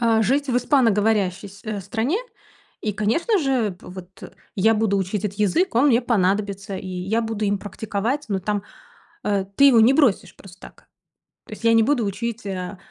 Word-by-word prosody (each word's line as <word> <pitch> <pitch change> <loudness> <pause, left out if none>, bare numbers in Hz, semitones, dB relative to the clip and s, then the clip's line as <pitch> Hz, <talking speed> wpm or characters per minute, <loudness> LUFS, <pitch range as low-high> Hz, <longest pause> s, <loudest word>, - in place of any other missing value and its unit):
Э, 225 -1 +3
жить 275 +6 +1
в 245 - +1
испаноговорящей 215 -7 +1
с 200 +1 -15
э, 215 -2 -4
стране 225 - -1 0.6
и, 215 - -2
конечно 230 - +1
же 255 - 0
вот, 180 -1 -10
э, - - -9 0.3
я 220 +4 +4
буду 215 -2 +1
учить 195 +2 -2
этот 200 0 -4
язык, 210 - +1
он 245 +5 +4
мне 240 -3 +4
понадобится, 200 -3 -1
и 190 - -8
я 185 +5 -2
буду 220 -1 -3
им 205 0 0
практиковать, 215 +7 -3
но 195 - 0
там, 205 +1 -2 0.6
э, 200 -2 0
ты 280 - +5
его 255 -5 +6
не 240 +4 +5
бросишь 275 -9 +2
просто 190 -1 -15
так. - - -15 0.6
То - - -10
есть - - -11
я 230 0 +4
не 225 - +5
буду 245 -1 +1
учить, 225 +2 -4
а, 190 0 -5
215 Hz, 190 wpm, -22 LUFS, 195-235 Hz, 0.6 s, его